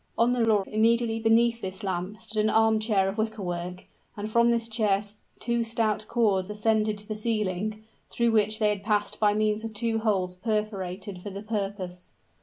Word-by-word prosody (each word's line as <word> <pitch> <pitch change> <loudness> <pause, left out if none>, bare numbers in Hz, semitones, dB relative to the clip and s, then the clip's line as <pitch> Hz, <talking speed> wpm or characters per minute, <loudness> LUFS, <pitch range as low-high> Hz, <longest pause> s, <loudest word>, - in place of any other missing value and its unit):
On 235 +2 +3
the 245 -2 +1
floor, 215 -3 +3
immediately 225 +1 +2
beneath 230 +1 +3
this 190 +2 -4
lamp, 190 +2 -3
stood 220 -1 -1
an 215 - +2
armchair 215 -3 +3
of 195 +3 -3
wicker 220 -1 -2
work; 175 +1 -5 0.3
and 210 +1 -4
from 235 +1 +4
this 230 -1 +1
chair 215 -3 +2 0.4
two 235 0 0
stout 225 -2 -1
cords 205 -5 +1
ascended 215 0 +1
to 205 0 -7
the 215 - -3
ceiling, 215 -1 -2 0.3
through 235 -1 +1
which 215 -1 +3
they 210 -1 +2
passed 210 0 -1
by 210 -1 +3
means 215 0 +1
of 225 -1 -6
two 225 +1 0
holes 190 -5 0
perforated 195 -2 -3
for 205 - -6
the 200 +1 -7
purpose. 195 -4 -4
215 Hz, 180 wpm, -27 LUFS, 200-225 Hz, 0.4 s, from